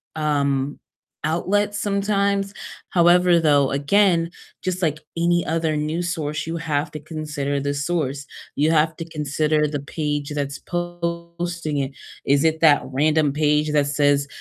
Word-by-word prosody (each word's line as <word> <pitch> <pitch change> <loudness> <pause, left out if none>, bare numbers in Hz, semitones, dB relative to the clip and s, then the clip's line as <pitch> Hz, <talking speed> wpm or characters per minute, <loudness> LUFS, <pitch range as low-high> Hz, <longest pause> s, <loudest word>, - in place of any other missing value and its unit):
um, 140 -2 0 0.4
outlets 205 +6 0
sometimes, 200 -1 0 0.4
however, 175 0 +5
though, 145 -4 +3
again, 170 +4 +2 0.3
just 185 0 -2
like 155 -4 +1 0.2
any 170 0 +2
other 160 -1 0
news 165 +4 -1
source, 155 -2 -3
you 165 +1 -3
have 150 -2 -1
to 150 0 -7
consider 150 -2 -3
the 140 +1 -2
source, 145 -2 -2 0.3
you 150 +2 +2
have 160 0 +2
to 165 - -6
consider 150 0 0
the 145 -1 -3
page 145 0 -3
that's 140 -1 -3
posting 170 -2 -4
it, 135 -1 -1 0.3
is 140 +1 +3
it 160 0 +2
that 155 -3 +6
random 150 +2 +2
page 150 +1 +1
that 145 -1 +3
says 145 -1 +2
155 Hz, 140 wpm, -22 LUFS, 145-170 Hz, 0.4 s, that